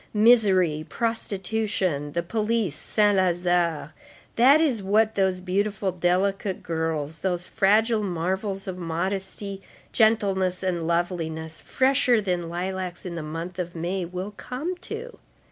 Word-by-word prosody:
Misery, 195 -8 +4
prostitution, 200 -8 -1
the 170 - -1
police, 215 -2 0
Saint 205 +5 +2
Lazare—that 175 - +1
is 275 -9 +1
what 215 +3 +2
those 190 -2 +1
beautiful, 195 +1 -1
delicate 185 +2 0
girls, 160 -2 -2
those 180 -2 -1
fragile 215 +4 +3
marvels 190 +2 -2
of 185 -1 -5
modesty, 190 +3 -3 0.3
gentleness 195 -5 +2
and 175 -3 -1
loveliness, 165 -2 -2
fresher 260 -3 +2
than 180 -4 -2
lilacs 180 +1 -4
in 180 - -4
the 170 - -4
month 165 +4 -6
of 175 -1 -4
May, 175 +3 -2
will 180 +4 -5
come 270 - -5
to. 450 +6 -8
190 Hz, 120 wpm, -25 LUFS, 175-210 Hz, 0.3 s, Misery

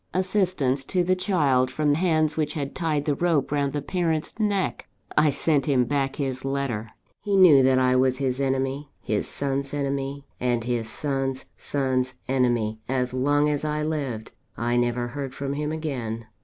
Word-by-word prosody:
Assistance 185 -8 +1
to 180 +3 +1
the 185 +1 +2
child, 145 -10 +2
from 145 +2 +1
hands 155 -2 +2
which 150 -2 -1
had 140 -2 -3
tied 155 -4 -1
the 150 - +2
rope 160 -2 +1
round 140 -1 +1
the 145 0 -3
parent's 165 -2 -1
neck! 205 -3 0 0.3
I 150 - +5
sent 145 0 +1
him 130 -4 +3
back 135 0 -1
his 130 -2 -3
letter. 135 -5 -2 0.3
He 200 -1 +1
knew 165 -8 +8
that 130 0 +4
I 130 0 +3
was 130 0 +3
his 130 -1 -1
enemy, 135 +1 -1
his 105 -1 -2
son's 140 0 -2
enemy, 140 0 -2
and 120 -2 0
his 120 -2 -2
son's 135 -2 -2
son's 130 -2 -1
enemy, 120 -4 +1
as 125 -1 0
long 145 +3 +2
as 150 -1 0
I 150 0 -1
lived. 140 -8 -3 0.3
I 120 +1 0
never 120 0 0
heard 135 0 -5
from 140 0 -3
him 150 +1 -2
again. 125 -8 -4
140 Hz, 170 wpm, -25 LUFS, 130-150 Hz, 0.3 s, knew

